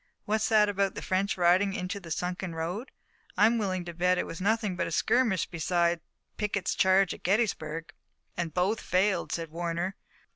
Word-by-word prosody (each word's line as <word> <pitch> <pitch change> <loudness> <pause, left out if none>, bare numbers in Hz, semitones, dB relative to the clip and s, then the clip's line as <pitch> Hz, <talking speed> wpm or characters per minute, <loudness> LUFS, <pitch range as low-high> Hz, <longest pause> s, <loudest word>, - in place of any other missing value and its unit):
What's 215 +1 +1
that 215 -2 +5
about 200 -1 0
the - - -6
French 190 +2 0
riding 185 +3 +4
into 185 +3 -3
the 175 -4 -11
sunken 180 +1 -3
road? 175 +10 -4 0.5
I'm 225 +3 +4
willin' 185 -4 -2
to 170 - -6
bet 180 +2 +2
it - - 0
was 165 - -7
nothing 210 -1 +1
but 180 - -1
a - - -5
skirmish 230 -8 +2
beside 170 0 0 0.4
Pickett's 200 -3 -1
charge 190 -1 +3
at - - -11
Gettysburg." 165 -6 -1 0.4
"And 170 -2 -2
both 190 +6 0
failed," 190 +2 +1
said 165 -2 -3
Warner. 170 +3 -2
185 Hz, 175 wpm, -29 LUFS, 175-205 Hz, 0.5 s, that